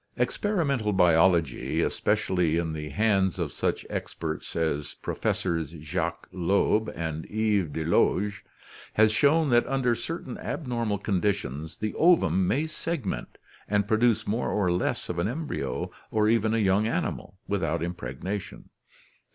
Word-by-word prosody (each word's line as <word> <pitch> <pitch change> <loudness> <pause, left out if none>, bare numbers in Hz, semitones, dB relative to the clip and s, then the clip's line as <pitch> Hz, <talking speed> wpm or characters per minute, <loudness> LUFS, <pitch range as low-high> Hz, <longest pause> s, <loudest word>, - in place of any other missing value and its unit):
— - - -33
Experimental 140 - 0
biology, 85 -5 +3
especially 90 -6 +1
in 80 -2 -1
the 75 -1 -5
hands 100 -3 +2
of - - -2
such - - -2
experts 80 -1 -5
as 75 -3 -1
Professors 80 -2 -2
Jacques 75 0 -3
Loeb 100 +4 +1
and 80 -1 -4
Yves 105 -5 +1
Delage, 90 +5 +1 0.5
has 110 0 +5
shown 145 +6 +3
that 120 0 +4
under 130 -2 +1
certain 140 +9 -5
abnormal 115 -8 -2
conditions 95 - -2
the 110 0 -3
ovum 95 - +4
may 145 - +1
segment 155 - -4 0.3
and 105 0 +1
produce 110 +1 +2
more 115 +4 -1
or 95 -4 +1
less 90 - -1
of 90 - -3
an 85 - +1
embryo 150 +6 -3 0.2
or 105 -1 +2
even 110 0 +2
a - - +2
young 100 0 +3
animal - - -3
without - - -1
impregnation. 90 +3 -5
100 Hz, 135 wpm, -27 LUFS, 85-115 Hz, 0.5 s, has